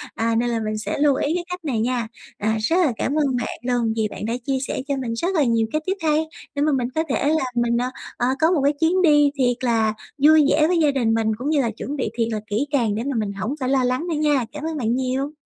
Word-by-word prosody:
À, 230 Hz, 0 st, 0 dB
nên 240 Hz, +1 st, +1 dB
là 230 Hz, -, -1 dB
mình 215 Hz, -1 st, -3 dB
sẽ 215 Hz, -, -3 dB
lưu 290 Hz, -2 st, +4 dB
ý 290 Hz, +4 st, 0 dB
cái 355 Hz, -, -2 dB
cách 360 Hz, -2 st, -6 dB
này 255 Hz, -7 st, -1 dB
nha. 240 Hz, -1 st, -1 dB, 0.3 s
À, 220 Hz, +1 st, 0 dB
rất 325 Hz, +10 st, +1 dB
là 345 Hz, -7 st, +3 dB
cảm 280 Hz, -, -1 dB
ơn 285 Hz, -4 st, +1 dB
bạn 245 Hz, -, -3 dB, 0.2 s
luôn 230 Hz, -2 st, 0 dB
vì 220 Hz, -1 st, 0 dB
bạn -, -, -6 dB
đã 225 Hz, -, -1 dB
chia 270 Hz, -1 st, 0 dB
sẻ -, -, -3 dB
cho 280 Hz, -, 0 dB
mình 245 Hz, -3 st, -3 dB
rất 345 Hz, +11 st, -1 dB
là 310 Hz, -, +4 dB
nhiều 230 Hz, -3 st, +2 dB
cái 310 Hz, -, 0 dB
tip 380 Hz, +1 st, -1 dB
hay 310 Hz, 0 st, +2 dB, 0.3 s
để 285 Hz, -, -1 dB
mà 305 Hz, -, +3 dB
mình 255 Hz, -3 st, 0 dB
có 320 Hz, -, +2 dB
thể 280 Hz, +2 st, +1 dB
là 315 Hz, -1 st, +2 dB
mình, 240 Hz, 0 st, +1 dB
ờ, 245 Hz, +1 st, 0 dB, 0.3 s
ờ, 245 Hz, -, +1 dB
có 320 Hz, +2 st, +4 dB
một 320 Hz, -6 st, +2 dB
cái 285 Hz, +1 st, +3 dB
chuyến 340 Hz, +3 st, +2 dB
đi 295 Hz, -4 st, +5 dB
thiệt 245 Hz, -3 st, +1 dB
là 225 Hz, -3 st, +2 dB, 0.3 s
vui 310 Hz, 0 st, +7 dB
vẻ 305 Hz, +1 st, +4 dB
với 355 Hz, +1 st, +2 dB
gia 300 Hz, -2 st, +4 dB
đình 240 Hz, -5 st, +1 dB
mình, 225 Hz, -1 st, +1 dB
cũng 270 Hz, +5 st, -3 dB
như 295 Hz, -3 st, +3 dB
là 235 Hz, -, -1 dB
chuẩn 260 Hz, +6 st, -6 dB
bị 260 Hz, -6 st, -2 dB
thiệt 230 Hz, -1 st, +1 dB
là 215 Hz, -, -1 dB
kỹ 225 Hz, +7 st, -1 dB
càng 235 Hz, -8 st, +1 dB
để 225 Hz, -, -2 dB
mà 275 Hz, 0 st, -2 dB
mình 205 Hz, -2 st, -2 dB
hổng 210 Hz, +8 st, -3 dB
phải 255 Hz, -2 st, -1 dB
lo 265 Hz, -1 st, +2 dB
lắng 255 Hz, +7 st, -1 dB
nữa 335 Hz, -, -1 dB
nha. 295 Hz, -4 st, +2 dB
Cảm 300 Hz, 0 st, -7 dB
ơn 320 Hz, -1 st, -3 dB
bạn 235 Hz, -3 st, 0 dB
nhiều. 260 Hz, +2 st, -1 dB
265 Hz, 290 wpm, -22 LUFS, 230-300 Hz, 0.3 s, vui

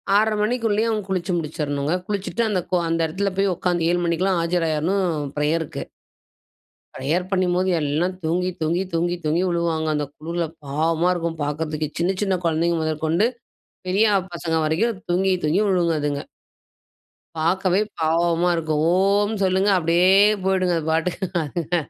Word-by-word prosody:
6:30 215 Hz, +1 st, +3 dB
மணிக்குள்ளேயே 225 Hz, -1 st, +1 dB
அவங்க 215 Hz, -2 st, -1 dB
குளிச்சு 185 Hz, -1 st, -1 dB
முடிச்சறணுங்க. 150 Hz, -2 st, -2 dB
குளிச்சுட்டு 205 Hz, +3 st, -2 dB
அந்த 195 Hz, -, +1 dB, 0.3 s
அந்த 165 Hz, 0 st, 0 dB
இடத்தில 195 Hz, +5 st, -2 dB
போய் 195 Hz, -1 st, +2 dB
உட்காந்து, 175 Hz, -1 st, 0 dB
7 175 Hz, -, +1 dB
மணிக்கெல்லாம் 175 Hz, +2 st, +1 dB
ஆஜராகிறணும் 170 Hz, +2 st, 0 dB, 0.3 s
பிரேயருக்கு. 155 Hz, +1 st, -1 dB, 1.1 s
பிரேயர் 160 Hz, +7 st, -1 dB
பண்ணும்போது 185 Hz, -1 st, +1 dB
எல்லாம் 155 Hz, +5 st, 0 dB
தூங்கி 180 Hz, +3 st, 0 dB
தூங்கி 170 Hz, +4 st, +1 dB
தூங்கி 175 Hz, +1 st, 0 dB
தூங்கி 155 Hz, +3 st, +1 dB
விழுவாங்க, 165 Hz, -2 st, 0 dB
அந்த 150 Hz, 0 st, -1 dB
குளிரில 170 Hz, +2 st, -3 dB, 0.2 s
பாவமா 160 Hz, +5 st, +1 dB
இருக்கும் 170 Hz, -2 st, -3 dB
பார்க்கறதுக்கு. 155 Hz, +1 st, -2 dB
சின்ன 180 Hz, +3 st, +1 dB
சின்ன 195 Hz, -3 st, +1 dB
குழந்தைகள் 165 Hz, 0 st, +1 dB
முதற்கொண்டு, 160 Hz, +5 st, +1 dB, 0.6 s
பெரியாப்பசங்க 185 Hz, -5 st, +1 dB
வரைக்கும் 190 Hz, +7 st, 0 dB
தூங்கி 190 Hz, +2 st, +2 dB
தூங்கி 160 Hz, +7 st, +2 dB
விழுங்க 175 Hz, -3 st, +2 dB
அதுங்க. 145 Hz, -1 st, -2 dB, 1.2 s
பார்க்கவே, 185 Hz, +3 st, +1 dB, 0.2 s
பாவமா 170 Hz, +2 st, +2 dB
இருக்கும். 155 Hz, -2 st, -1 dB
"ஓம்! 200 Hz, +3 st, +2 dB
சொல்லுங்க" 190 Hz, +2 st, +2 dB
அப்டியே 170 Hz, +1 st, +3 dB, 0.4 s
போயுடுங்க 185 Hz, -2 st, +2 dB
அது 160 Hz, 0 st, -4 dB
பாட்டுக்கு 170 Hz, +4 st, -1 dB, 0.2 s
அதுங்க. 165 Hz, +3 st, -3 dB
170 Hz, 130 wpm, -22 LUFS, 160-190 Hz, 1.2 s, 6:30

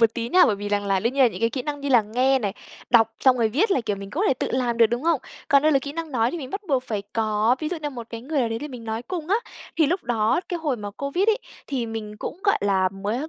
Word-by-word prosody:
một 230 Hz, -1 st, +4 dB
tí 235 Hz, -1 st, -3 dB
nha, 365 Hz, +6 st, +6 dB
bởi 210 Hz, -, +1 dB
vì 205 Hz, +1 st, -5 dB
rằng 205 Hz, 0 st, 0 dB
là 195 Hz, -1 st, +2 dB
đương 235 Hz, +5 st, 0 dB
nhiên 275 Hz, 0 st, +3 dB
là 245 Hz, -, +6 dB
những 185 Hz, -1 st, -8 dB
cái 230 Hz, -, +2 dB
kỹ 255 Hz, +1 st, -3 dB
năng 290 Hz, +1 st, -4 dB
như 280 Hz, -, -3 dB
là 240 Hz, -4 st, +5 dB
nghe 255 Hz, +5 st, +2 dB
này, 205 Hz, -5 st, -2 dB, 0.4 s
đọc 225 Hz, -2 st, +5 dB
xong 260 Hz, -1 st, +5 dB
rồi 225 Hz, -2 st, +3 dB
viết 335 Hz, -, +1 dB
là, 275 Hz, -, +3 dB
kiểu, 215 Hz, -3 st, -2 dB
mình 195 Hz, 0 st, -8 dB
có 345 Hz, -, -1 dB
thể -, -, +3 dB
tự -, -, -3 dB
làm 245 Hz, -2 st, 0 dB
được, 230 Hz, -1 st, +6 dB
đúng 240 Hz, +3 st, -3 dB
không? 325 Hz, -4 st, +2 dB, 0.3 s
Còn 280 Hz, -1 st, +5 dB
đây 310 Hz, 0 st, +4 dB
là 275 Hz, -, +5 dB
kỹ 280 Hz, +1 st, -6 dB
năng 330 Hz, 0 st, -5 dB
nói 230 Hz, 0 st, +2 dB
thì 345 Hz, -, -4 dB
mình 265 Hz, -3 st, -7 dB
bắt 395 Hz, -, -3 dB
buộc 265 Hz, -3 st, +2 dB
phải 215 Hz, -5 st, -3 dB
có 220 Hz, +2 st, +2 dB
ví 310 Hz, -, -2 dB
dụ 355 Hz, -, -3 dB
như 295 Hz, -, -2 dB
một 240 Hz, -4 st, -8 dB
cái 230 Hz, -, -6 dB
người 285 Hz, +4 st, -1 dB
nào 235 Hz, -, +1 dB
đấy 225 Hz, 0 st, -3 dB
để 295 Hz, -, -6 dB
mình 250 Hz, -4 st, -9 dB
nói 220 Hz, +1 st, -3 dB
cùng 345 Hz, +1 st, -5 dB
á, 400 Hz, -, +4 dB, 0.4 s
thì 320 Hz, -, +4 dB
lúc 355 Hz, +6 st, -1 dB
đó, 225 Hz, +2 st, +1 dB
cái 350 Hz, -, -2 dB
hồi 300 Hz, -6 st, -1 dB
mà 205 Hz, -2 st, -6 dB
Covid 280 Hz, -, -1 dB
ấy, 440 Hz, +1 st, +3 dB, 0.3 s
thì 255 Hz, -4 st, -2 dB
mình 220 Hz, -2 st, -6 dB
cũng, 330 Hz, -, -6 dB
gọi 400 Hz, -, +3 dB
là, 195 Hz, -2 st, +2 dB
mới 205 Hz, +10 st, -3 dB
245 Hz, 320 wpm, -24 LUFS, 220-290 Hz, 0.4 s, nha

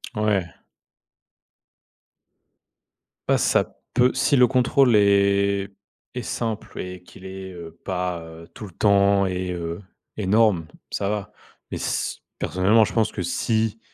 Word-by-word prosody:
Ouais. 105 Hz, -4 st, +1 dB, 2.8 s
Ah, -, -, +5 dB
ça -, -, +1 dB, 0.2 s
peut 125 Hz, +1 st, +3 dB
si 140 Hz, -, +2 dB
le 125 Hz, 0 st, +6 dB
contrôle 125 Hz, -1 st, +3 dB
est 100 Hz, -1 st, +3 dB, 0.4 s
est 125 Hz, -, -4 dB
simple 115 Hz, -2 st, -4 dB
et 90 Hz, -1 st, -6 dB
qu'il 95 Hz, -, -15 dB
est, 95 Hz, 0 st, -7 dB
heu, 85 Hz, -2 st, -10 dB
pas, 90 Hz, -2 st, -2 dB
heu, 80 Hz, +1 st, -12 dB
tout -, -, -10 dB
le 95 Hz, -, -11 dB
temps 100 Hz, 0 st, +3 dB
et 90 Hz, 0 st, -2 dB
heu, 85 Hz, 0 st, -4 dB, 0.3 s
énorme, 105 Hz, -4 st, +2 dB, 0.2 s
ça 100 Hz, -, -1 dB
va 105 Hz, 0 st, -4 dB, 0.4 s
mais -, -, -4 dB
s -, -, -2 dB, 0.2 s
personnellement, 100 Hz, +6 st, +3 dB
je -, -, -6 dB
pense 115 Hz, -2 st, +1 dB
que -, -, -5 dB
si 110 Hz, +5 st, 0 dB
100 Hz, 135 wpm, -23 LUFS, 90-110 Hz, 2.8 s, le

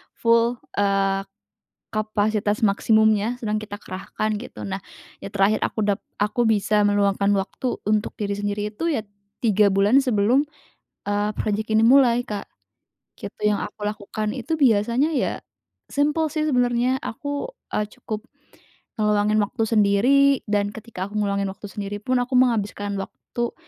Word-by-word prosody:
full, 230 Hz, +1 st, +3 dB, 0.2 s
eee, 195 Hz, -1 st, +1 dB, 0.7 s
kapasitas 215 Hz, -1 st, 0 dB
maksimumnya 220 Hz, +2 st, +3 dB
sedang 215 Hz, -2 st, -1 dB
kita 205 Hz, 0 st, -8 dB
kerahkan 210 Hz, +3 st, -3 dB
gitu. 220 Hz, 0 st, -8 dB
Nah 195 Hz, 0 st, -4 dB, 0.4 s
yang 200 Hz, -, -7 dB
terakhir 200 Hz, +1 st, +2 dB
aku -, -, -2 dB
dap 205 Hz, -1 st, 0 dB, 0.2 s
aku 210 Hz, +4 st, +1 dB
bisa 210 Hz, -1 st, +2 dB
meluangkan 200 Hz, 0 st, +2 dB
waktu 200 Hz, +6 st, -2 dB
untuk 210 Hz, 0 st, +1 dB
diri 200 Hz, -1 st, -1 dB
sendiri 205 Hz, 0 st, -2 dB
itu 335 Hz, +9 st, -1 dB
ya 280 Hz, -, 0 dB, 0.4 s
3 210 Hz, -3 st, +3 dB
bulan 200 Hz, +5 st, +4 dB
sebelum, 245 Hz, +3 st, +3 dB, 0.7 s
eee, 205 Hz, +1 st, +1 dB
project 215 Hz, +1 st, -2 dB
ini 220 Hz, +1 st, +4 dB
mulai, 245 Hz, -1 st, +5 dB
Kak, 210 Hz, -4 st, -5 dB, 0.7 s
gitu, -, -, -9 dB
yang 210 Hz, -, +1 dB
aku 205 Hz, -, -6 dB
lakukan 215 Hz, +1 st, -3 dB
itu 265 Hz, +6 st, -2 dB
biasanya 240 Hz, +3 st, +3 dB
ya -, -, 0 dB, 0.5 s
simpel 300 Hz, +3 st, +1 dB
sih, 310 Hz, -1 st, 0 dB
sebenarnya 250 Hz, -1 st, +2 dB
aku, 285 Hz, -, -4 dB, 0.3 s
eee, 210 Hz, -, 0 dB
cukup 220 Hz, 0 st, -5 dB, 0.7 s
ngeluangin 210 Hz, 0 st, +2 dB
waktu 205 Hz, +2 st, -1 dB
sendiri 215 Hz, +5 st, +4 dB, 0.3 s
dan 205 Hz, -1 st, +1 dB
ketika 215 Hz, -4 st, -6 dB
aku 210 Hz, -, -5 dB
ngeluangin 200 Hz, -1 st, 0 dB
waktu 200 Hz, +2 st, -10 dB
sendiri 205 Hz, +1 st, -5 dB
pun 255 Hz, +2 st, +1 dB
aku 245 Hz, +2 st, -4 dB
menghabiskan 210 Hz, -5 st, +1 dB
waktu 235 Hz, +4 st, -5 dB
215 Hz, 140 wpm, -23 LUFS, 205-235 Hz, 0.7 s, mulai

